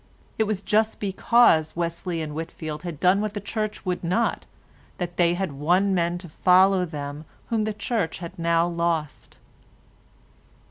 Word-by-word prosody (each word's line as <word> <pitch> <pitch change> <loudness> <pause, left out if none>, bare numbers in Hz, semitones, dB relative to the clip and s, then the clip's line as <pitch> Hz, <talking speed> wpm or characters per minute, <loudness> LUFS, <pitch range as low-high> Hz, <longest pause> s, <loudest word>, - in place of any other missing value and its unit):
It 220 - +3
was 205 -2 -2
just 220 +1 +1
because 195 -5 +3
Wesley 170 0 -2
and 150 -1 -6
Whitfield 160 -1 -6
had 170 -5 -6
done 185 +3 +4
what 215 0 -3
the - - -2
Church 215 +1 -4
would 180 -1 -2
not 185 +8 0 0.5
that 175 -1 -5
they 175 -1 +3
had 190 -3 -2
won 175 +8 +2
men 175 -1 0
to 175 0 -9
follow 185 +3 +4
them 145 -2 -6 0.3
whom 225 -3 +1
the 215 - -1
Church 210 -4 -2
had 170 0 -9
now 170 0 +2
lost. 170 -3 -2
175 Hz, 155 wpm, -24 LUFS, 165-200 Hz, 0.5 s, done